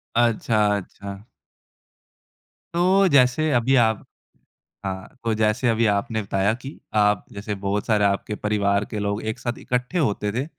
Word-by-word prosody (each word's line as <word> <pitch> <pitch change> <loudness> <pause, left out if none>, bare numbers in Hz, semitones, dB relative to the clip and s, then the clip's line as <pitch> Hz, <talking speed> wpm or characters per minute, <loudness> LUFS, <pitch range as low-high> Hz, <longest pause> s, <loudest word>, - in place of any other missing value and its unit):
अच्छा, 115 -2 +2
अच्छा। 100 +1 -8 1.5
तो 185 +3 +4
जैसे 140 +2 +3
अभी 125 +3 +3
आप 110 -3 +3 0.8
हाँ, 95 0 -4 0.2
तो 115 -1 +1
जैसे 110 +3 +1
अभी 115 0 +2
आपने 110 +2 -1
बताया 100 +1 0
कि 135 +2 -9 0.2
आप 105 -1 +3
जैसे 105 +1 -4
बहुत 100 +1 -1
सारे 105 -2 +2
आपके 100 +2 0
परिवार 100 -1 0
के 105 - -3
लोग 100 +1 -2
एक 120 - -10
साथ 120 -1 -3
इकट्ठे 125 +8 -2
होते 105 -8 0
थे, 130 +4 -1
110 Hz, 145 wpm, -23 LUFS, 100-125 Hz, 1.5 s, तो